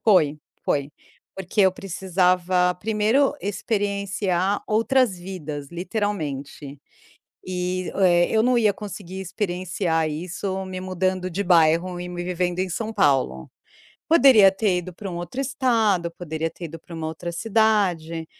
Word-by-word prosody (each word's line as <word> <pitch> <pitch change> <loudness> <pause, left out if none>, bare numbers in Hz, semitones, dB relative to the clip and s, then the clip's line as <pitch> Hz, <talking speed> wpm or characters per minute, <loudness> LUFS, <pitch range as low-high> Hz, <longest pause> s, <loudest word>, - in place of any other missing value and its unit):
Foi, 170 -9 +4 0.3
foi, 140 0 -1 0.4
porque 190 +2 -1
eu 190 -1 +5
precisava 180 -1 +1
primeiro 220 +7 +2
experienciar 200 -2 -1
outras 230 0 +2
vidas 155 -6 -6
literalmente. 155 - -4 0.7
E, 180 0 -2
eh, 175 -3 +4
eu 220 0 +2
não 250 0 +3
ia 215 -3 +3
conseguir 195 -2 -7
experienciar 180 -4 -1
isso 185 +4 -4
me 185 0 -6
mudando 185 0 -1
de 190 +3 -2
bairro 170 +1 +3
e 180 0 -6
me 175 0 -5
vivendo 180 0 -2
em 190 - 0
São 220 +5 -3
Paulo. 135 - +1 0.6
Poderia 265 -11 +7
ter 190 -1 0
ido 180 +1 -6
para 195 +2 -7
um 170 - -5
outro 175 +10 -4
estado, 230 -10 +1
poderia 165 -1 -4
ter 170 +2 -9
ido 165 0 -8
para 170 +2 -11
uma 160 -1 -4
outra 160 +2 -5
cidade, 190 -6 +1
185 Hz, 135 wpm, -23 LUFS, 170-205 Hz, 0.7 s, Poderia